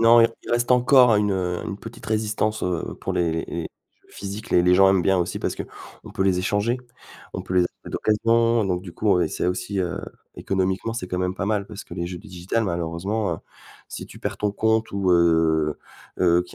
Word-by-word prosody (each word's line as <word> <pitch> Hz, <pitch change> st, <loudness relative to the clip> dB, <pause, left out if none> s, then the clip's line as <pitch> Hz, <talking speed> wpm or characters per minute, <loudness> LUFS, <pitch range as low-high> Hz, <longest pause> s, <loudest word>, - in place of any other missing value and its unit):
non, 115 Hz, +1 st, +7 dB
i -, -, +7 dB, 0.2 s
il -, -, -8 dB
reste 120 Hz, +1 st, +1 dB
encore 125 Hz, -1 st, +6 dB
une, 105 Hz, 0 st, +2 dB
heu, 90 Hz, -2 st, -1 dB
une 100 Hz, -, -5 dB
petite 115 Hz, +1 st, -11 dB
résistance, 110 Hz, 0 st, -1 dB
heu, 90 Hz, -2 st, -2 dB
pour -, -, -3 dB
les 85 Hz, -2 st, +1 dB
les 80 Hz, -, -2 dB
les 85 Hz, -, -3 dB, 0.4 s
jeux -, -, -29 dB
physiques, 100 Hz, +2 st, -7 dB
les 85 Hz, -, +5 dB
les 90 Hz, 0 st, +5 dB
gens 95 Hz, +1 st, +6 dB
aiment 95 Hz, -2 st, +3 dB
bien 95 Hz, +2 st, +3 dB
aussi 85 Hz, -, -1 dB
parce -, -, -2 dB
qu'on -, -, -10 dB
peut -, -, -1 dB
les 95 Hz, -2 st, +2 dB
échanger, 105 Hz, +6 st, 0 dB, 0.5 s
on -, -, -4 dB
peut 90 Hz, -, -5 dB
les 90 Hz, -, +5 dB
acheter 90 Hz, -, -6 dB
d'occasion, 115 Hz, +1 st, +2 dB
donc 90 Hz, -2 st, -1 dB
du 90 Hz, -3 st, -9 dB
coup, 100 Hz, -3 st, +2 dB
et 80 Hz, -, +1 dB
c'est -, -, -2 dB
aussi, 90 Hz, +2 st, -2 dB
heu, 90 Hz, +1 st, -2 dB, 0.4 s
économiquement, 95 Hz, +3 st, -1 dB
c'est 115 Hz, -6 st, -4 dB
quand 90 Hz, -, -2 dB
même 90 Hz, 0 st, -1 dB
pas 100 Hz, -, -3 dB
mal, 105 Hz, -2 st, 0 dB
parce 105 Hz, -1 st, -9 dB
que -, -, -10 dB
les 85 Hz, -1 st, -3 dB
jeux 90 Hz, 0 st, -6 dB
digital 95 Hz, +3 st, -3 dB
malheureusement, 85 Hz, +2 st, -2 dB
heu, -, -, -8 dB, 0.5 s
si -, -, -7 dB
tu -, -, -13 dB
perds -, -, -3 dB
ton 105 Hz, -, 0 dB
compte, 110 Hz, +1 st, +1 dB
ou, 100 Hz, -2 st, +1 dB
heu 80 Hz, -3 st, +3 dB, 0.4 s
heu, 85 Hz, -1 st, +4 dB
qu'il 90 Hz, -, -15 dB
95 Hz, 225 wpm, -23 LUFS, 90-110 Hz, 0.5 s, non